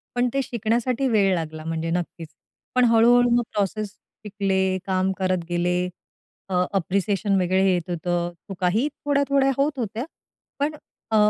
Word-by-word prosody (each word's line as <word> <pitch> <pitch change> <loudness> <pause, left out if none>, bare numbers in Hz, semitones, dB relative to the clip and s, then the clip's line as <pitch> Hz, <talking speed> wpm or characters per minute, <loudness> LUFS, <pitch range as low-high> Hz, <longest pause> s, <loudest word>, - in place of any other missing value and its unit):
पण 245 0 +2
ते 275 - +1
शिकण्यासाठी 240 +3 0
वेळ 205 -5 +3
लागला 160 -1 -4
म्हणजे 165 0 -2
नक्कीच. 170 -1 -3 0.5
पण 250 -1 +5
हळू-हळू 240 +1 +5
मग 240 - +2
प्रोसेस 205 +1 -1 0.4
शिकले, 190 -2 0
काम 190 0 +1
करत 185 -2 0
गेले. 175 +1 +1 0.7
अ, 180 -1 +2
अप्रिसिएशन 195 +2 +1
वगैरे 185 +1 +2
येत 175 -1 -2
होतं. 175 0 -1 0.2
चुकाही 195 +8 +1 0.2
थोड्या-थोड्या 280 -1 +3
होत 280 0 0
होत्या, 230 +2 -3 0.5
पण 295 +2 0 0.4
अ, - - +2
195 Hz, 140 wpm, -24 LUFS, 180-245 Hz, 0.7 s, पण